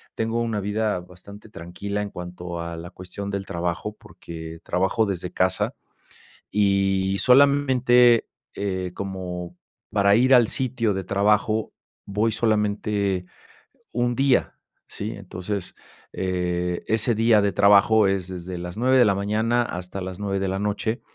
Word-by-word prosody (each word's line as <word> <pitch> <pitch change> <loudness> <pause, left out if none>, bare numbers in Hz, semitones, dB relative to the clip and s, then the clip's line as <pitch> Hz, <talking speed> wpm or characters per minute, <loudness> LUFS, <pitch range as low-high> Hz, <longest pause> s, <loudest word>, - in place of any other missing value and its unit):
tengo 115 +1 -1
una 115 -3 -1
vida 105 0 -1
bastante 95 +4 -14
tranquila 100 +3 -5
en 105 - -4
cuanto 90 -1 -7
a 85 0 -5
la 85 +1 -8
cuestión 95 +2 -7
del 100 -1 -3
trabajo, 90 +4 -3
porque 80 -1 -10
trabajo 95 +5 +1
desde 90 -3 -4
casa 95 0 0 0.8
y 100 -1 +2
solamente, 125 -3 +5 0.3
eh, 95 -2 -3
como 90 -3 -6 0.3
para 100 -1 +4
ir 130 +4 +5
al 120 -3 +6
sitio 120 -4 0
de 95 -1 -3
trabajo, 105 +3 +1 0.3
voy 105 +3 0
solamente 105 -3 0 0.7
un 120 0 0
día, 135 -1 +2 0.3
¿si?, 105 +2 -5
entonces, 95 0 -6 0.4
eh, 90 -1 -2
ese 110 +2 +2
día 110 0 +4
de 100 -1 +1
trabajo 100 +2 +5
es 95 -2 -1
desde 90 0 -6
las 90 +1 -7
9 130 +3 +3
de 125 - +7
la 105 -3 +3
mañana 110 +4 +1
hasta 90 -2 -6
las 95 0 -6
9 100 -1 -2
de 95 - -1
la 95 +1 -2
noche. 105 +4 -2
100 Hz, 140 wpm, -24 LUFS, 90-110 Hz, 0.8 s, de